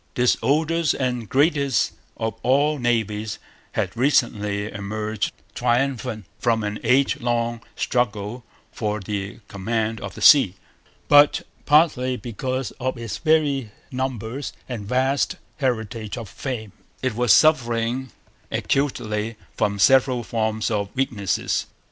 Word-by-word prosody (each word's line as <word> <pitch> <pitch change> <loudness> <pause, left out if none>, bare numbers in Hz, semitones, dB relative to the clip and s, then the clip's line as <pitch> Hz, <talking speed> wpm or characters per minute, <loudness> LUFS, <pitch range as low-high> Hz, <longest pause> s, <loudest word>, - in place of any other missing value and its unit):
This 125 0 +4
oldest 160 +3 +2
and 125 -4 -2
greatest 140 -3 +2 0.3
of 110 -1 -2
all 145 +4 +2
navies 110 -3 -1 0.4
had - - -1
recently 105 -6 +1
emerged 105 +1 -3 0.2
triumphant 120 -3 0
from 115 -2 +1
an 105 0 -3
age 130 +4 +3
long 120 -1 0
struggle 115 -1 -1 0.3
for 105 -1 -2
the 100 +2 -5
command 110 +2 -2
of - - -6
the - - -9
sea. 130 - +7 0.5
But, 145 0 +6 0.2
partly 145 -5 +4
because 130 +4 -3
of 130 0 -2
its 115 -3 -5
very 150 -6 +2 0.2
numbers 130 0 -3
and 115 -6 -5
vast 130 +4 +1 0.2
heritage 110 -5 -2
of 115 - -6
fame, 110 0 -5 0.3
it 130 -3 +1
was 120 0 +2
suffering 120 -2 +3 0.4
acutely 115 -5 -1 0.2
from 100 -1 0
several 130 +2 +4
forms 110 -1 -1
of 100 -2 -1
weakness. 115 -8 -1
120 Hz, 120 wpm, -23 LUFS, 110-130 Hz, 0.5 s, sea